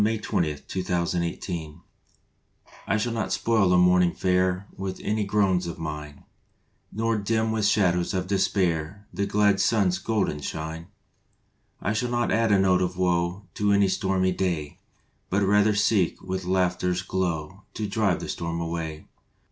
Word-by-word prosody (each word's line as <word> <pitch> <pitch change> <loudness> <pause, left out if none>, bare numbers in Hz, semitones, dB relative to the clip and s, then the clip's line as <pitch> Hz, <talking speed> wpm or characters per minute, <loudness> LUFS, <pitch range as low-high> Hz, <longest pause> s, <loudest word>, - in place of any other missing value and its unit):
March 110 0 0
Twenty 80 -3 0
first 75 - -12
NO 90 -1 +1 0.3
TRIBUTE 80 -5 -6 1.2
SHALL 115 +2 -1
not 115 -2 -2
spoil 110 -5 +2
a 90 - +5
morning 90 0 +4
fair 90 +1 +1
With 95 -1 -5
any 105 0 0
groans 95 -3 +1
of 85 - -5
mine, 75 -2 -6 0.7
Nor 115 0 0
dim 110 +2 0
with 110 -2 +1
shadows 90 -4 +2
of 95 0 -1
despair 95 -1 0
The 100 - -1
glad 100 -1 +3
sun 105 -5 +3
s 90 0 -1
golden 105 -9 -1
shine. 80 +3 -5 0.9
I 100 - -1
shall 120 +3 -1
not 120 0 0
add 115 -1 +2
a 100 - +5
note 95 -1 +3
of 90 0 -1
woe 90 +1 0
To 105 0 +1
any 100 -1 +4
stormy 95 -1 +1
day, 85 -6 -2 0.5
But 100 +2 +1
rather 105 +2 +3
seek 100 -4 +2
with 95 0 -4
laughter 90 -1 +1
s 90 0 -1
glow 90 -1 -3
To 105 - -2
drive 100 -3 0
the - - -5
storm 85 0 -3
away. 80 -2 -4
95 Hz, 160 wpm, -25 LUFS, 85-105 Hz, 1.2 s, a